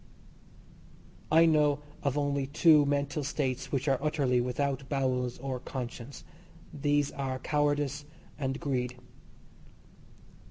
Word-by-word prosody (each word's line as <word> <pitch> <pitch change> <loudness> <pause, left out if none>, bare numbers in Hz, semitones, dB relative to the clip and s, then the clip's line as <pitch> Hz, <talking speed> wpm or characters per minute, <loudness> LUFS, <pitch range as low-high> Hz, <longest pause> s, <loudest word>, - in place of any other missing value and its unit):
I 165 +1 +7
know 150 -3 +4 0.2
of 140 -1 0
only 140 -1 0
two 150 0 +5
mental 145 +1 0
states 135 -2 -2
which 135 +1 -1
are 135 -2 +2
utterly 140 -5 +1
without 135 +2 -2
bowels 130 -3 0
or 130 -1 -4
conscience. 125 0 -7 0.5
These 145 -1 +1
are 135 -2 -3
cowardice 145 +1 0 0.3
and 135 -1 -2
greed. 125 -3 -2
140 Hz, 110 wpm, -30 LUFS, 130-145 Hz, 0.5 s, I